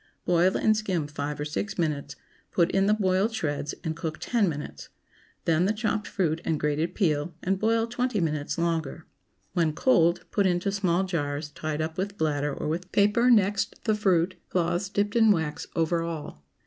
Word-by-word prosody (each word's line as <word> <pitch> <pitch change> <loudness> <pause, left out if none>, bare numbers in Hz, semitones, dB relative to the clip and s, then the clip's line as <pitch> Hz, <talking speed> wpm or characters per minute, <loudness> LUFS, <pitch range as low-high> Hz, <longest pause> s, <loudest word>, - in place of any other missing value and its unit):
Boil 180 +1 +3
and 215 - +3
skim 190 -7 -1
five 145 0 -4
or 150 - -2
six 175 +7 -3
minutes; 150 -4 -2 0.4
put 170 -1 +2
in 195 0 +2
the 210 - +5
boiled 195 +2 +1
shreds, 145 -6 -2
and 160 -2 -2
cook 160 -2 -4
ten 225 -6 +1
minutes; 145 -2 -7 0.6
then 165 +2 +3
the 205 - +2
chopped 215 -1 -1
fruit 165 -4 -1
and 155 -2 -1
grated 150 +4 -1
peel, 155 -4 0
and 190 +1 0
boil 225 +1 +2
twenty 245 -1 -1
minutes 155 -3 -1
longer. 165 -2 -2 0.5
When 165 -4 +1
cold, 170 -4 +3
put 200 -2 +2
into 180 +2 0
small 190 -2 +1
jars, 145 -5 -3
tied 155 +1 -3
up 160 +2 -5
with 200 +1 -3
bladder 145 -2 0
or - - -4
with 175 +4 -3
paper 210 +5 +3
next 205 -4 +2
the 220 - +2
fruit, 185 -4 +2 0.2
cloths 175 +2 0
dipped 205 +1 -1
in 225 -2 +5
wax 160 -7 0
over 165 0 +1
all. 160 - -6
175 Hz, 180 wpm, -27 LUFS, 155-200 Hz, 0.6 s, the